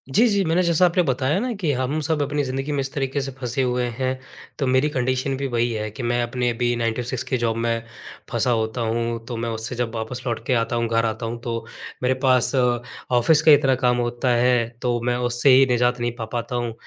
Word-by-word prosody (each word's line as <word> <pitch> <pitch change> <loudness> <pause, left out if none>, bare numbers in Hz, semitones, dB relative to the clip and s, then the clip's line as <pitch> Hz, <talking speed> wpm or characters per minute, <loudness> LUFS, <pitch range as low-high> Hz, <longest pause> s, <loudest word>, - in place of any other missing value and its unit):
जी, 235 +3 +6
जी। 200 -2 +2
मैंने 165 +3 +2
जैसा 170 +1 +4
आपने 175 +1 +2
बताया 135 +5 0
ना 250 +2 -2
कि 155 -5 +1
हम 130 +4 -1
सब 150 0 0
अपनी 145 +1 0
ज़िंदगी 135 +3 -3
में 145 - -1
इस 135 0 -2
तरीक़े 135 0 -1
से 135 0 -4
फँसे 125 +1 -2
हुए 125 -1 0
हैं 130 -1 0 0.5
तो 135 - 0
मेरी 130 +4 +3
कंडीशन 130 0 -1
भी 140 - -2
वही 120 -1 0
है 110 -1 -3
कि 120 - -7
मैं 120 0 +1
अपने 120 +1 -1
अभी 120 +1 0
9 115 -1 0
टू 125 - -3
6 125 0 -3
की 130 - -1
जॉब 115 -1 -1
में 115 0 -1 0.5
फँसा 125 - +1
होता 110 +1 -1
हूँ। 115 0 -2
तो 120 -2 -4
मैं 115 0 -2
उससे 115 +3 -4
जब 120 -1 -2
वापस 115 +3 -4
लौट 115 0 -3
के 130 - +2
आता 115 0 0
हूँ 115 -1 0
घर 115 0 +1
आता 110 +1 -3
हूँ। 115 +1 -4
तो 115 -1 -3 0.4
मेरे 125 +1 +3
पास 130 -2 +3
ऑफ़िस 125 +3 +1
का 155 - +6
इतना 135 -2 +5
काम 125 -1 +1
होता 120 +1 -1
है 120 -1 +3
तो 120 -2 0
मैं 120 0 +1
उससे 120 +2 +2
ही 135 +1 +7
निजात 125 0 +2
नहीं 120 0 -1
पा 115 - -5
पाता 120 +1 -3
हूँ। 120 -2 -2
125 Hz, 240 wpm, -22 LUFS, 120-135 Hz, 0.5 s, ही